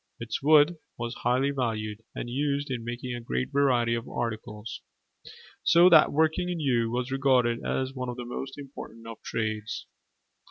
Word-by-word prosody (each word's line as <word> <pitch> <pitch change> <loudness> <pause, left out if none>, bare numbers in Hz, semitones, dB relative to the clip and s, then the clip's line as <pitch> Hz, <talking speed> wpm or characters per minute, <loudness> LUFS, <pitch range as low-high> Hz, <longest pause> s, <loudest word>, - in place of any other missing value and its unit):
Its 115 -1 -4
wood 155 +3 +5 0.2
was 120 0 -3
highly 130 +3 +2
valued 110 -5 -2
and - - -4
used 140 +2 -1
in 120 -3 -3
making 120 +1 -4
a 120 - -5
great 65 - -2
variety 125 -4 +3
of 115 0 -3
articles: 110 -2 -4 0.8
so 175 +2 +6
that 160 -3 +7
working 160 +4 +2
in 175 -2 -2
yew 120 -6 +1
was 125 +2 -2
regarded 130 -3 +2
as 130 0 -1
one 125 -2 -4
of 120 - -5
the 125 - -5
most 135 +3 -6
important 130 -5 -10
of 115 -1 -9
trades. 110 -1 -3
125 Hz, 165 wpm, -28 LUFS, 115-140 Hz, 0.8 s, that